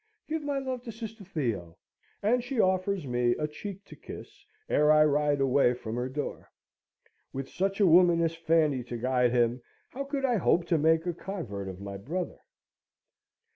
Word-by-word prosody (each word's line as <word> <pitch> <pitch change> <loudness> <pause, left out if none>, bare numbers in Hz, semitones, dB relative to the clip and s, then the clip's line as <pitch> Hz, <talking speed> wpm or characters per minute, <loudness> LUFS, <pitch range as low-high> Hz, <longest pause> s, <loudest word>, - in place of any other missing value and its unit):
Give 315 0 -2
my 285 -1 -2
love 260 -2 -3
to 230 - -5
sister 225 -1 -8
Theo!" 115 - -3 0.5
And 240 +4 +2
she 250 -1 -3
offers 185 -2 +1
me 120 -1 +1
a 150 - -1
cheek 195 +6 -8
to - - -12
kiss, - - -11 0.2
ere 150 0 +4
I 155 0 +6
ride 145 -1 +2
away 135 -2 +3
from 115 -2 -6
her 125 +1 -2
door. 145 +3 -5 0.8
With 135 0 -5
such 195 +2 -2
a 205 - +5
woman 175 0 +6
as 165 -1 +1
Fanny 160 -5 +2
to 120 -1 -5
guide 125 +1 +2
him, 120 0 +2 0.3
how 275 +2 -5
could 275 -1 -2
I 245 -3 +2
hope 175 -2 +2
to 165 -3 +3
make 160 +2 +3
a 175 - -1
convert 135 - -6
of 95 -1 -7
my 100 0 -6
brother? 170 - -4
160 Hz, 180 wpm, -29 LUFS, 125-200 Hz, 0.8 s, I